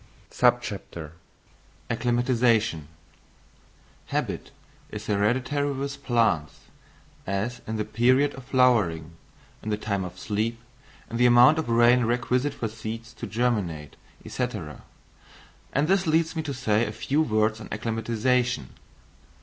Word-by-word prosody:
Acclimatisation. 115 - +1 1.2
Habit - - -3 0.4
is - - -7
hereditary 130 +8 0
with 140 +1 -5
plants, 110 - +1 0.7
as 100 +6 -2
in 110 - -3
the 105 - -1
period 130 +6 +3
of 135 -2 -11
flowering, 110 - +2 0.5
in 110 - -5
the 105 - 0
time 100 -3 -2
of 90 - -8
sleep, 110 +2 -2 0.5
in 115 - -2
the 125 +1 +5
amount 120 +6 +6
of 155 - -3
rain 120 +1 +5
requisite 125 +4 0
for 115 - -2
seeds 110 +1 -7
to - - -7
germinate, 100 - -1 0.3
&c., 125 - -1 1.2
and 140 +3 +1
this 190 -1 +2
leads 160 +1 +2
me 160 - -1
to 150 -3 -4
say 110 -3 +1
a 105 - -2
few 135 +7 0
words 110 -4 +1
on - - -8
acclimatisation. 115 - 0
115 Hz, 120 wpm, -26 LUFS, 105-125 Hz, 1.2 s, amount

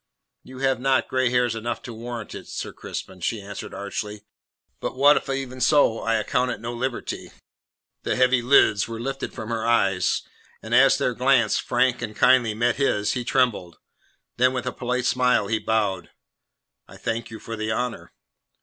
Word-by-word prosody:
"You 130 0 -13
have 135 -2 +1
not 130 -2 +2
grey 130 -1 +1
hairs 125 -1 +2
enough 115 +1 -3
to 120 - -7
warrant 115 -1 -7
it, - - -9
Sir - - -6
Crispin," 95 -1 -7
she 110 +5 -2
answered 100 0 -8
archly. 105 +1 -5 0.6
"But - - -4
what 145 +3 +6
if - - -2
even 135 -2 -4
so 130 -4 +4
I 115 0 0
account 125 +3 0
it - - -4
no 115 +2 -5
liberty?" 125 +1 -4 0.7
The - - -1
heavy 125 0 +3
lids 120 -5 +4
were 115 -1 -6
lifted 135 +3 -4
from 110 - -7
her 115 -1 -2
eyes, 100 -6 +2 0.4
and 110 - -7
as 135 +2 +6
their 130 -3 0
glance, 125 -3 +3
frank 125 0 +1
and 110 -3 -5
kindly, 120 0 +4
met 120 +1 +1
his, 105 -7 +1
he 125 - -2
trembled. 120 -10 0 0.6
Then, 125 +1 +3
with 125 -1 -3
a 125 - -2
polite 125 0 -2
smile, 125 -4 +2
he 110 +2 0
bowed. 100 -7 -1 0.8
"I - - -13
thank 115 0 -3
you 110 - -8
for 115 - -6
the 110 0 -3
honour." 125 +1 -3
120 Hz, 180 wpm, -24 LUFS, 110-130 Hz, 0.8 s, what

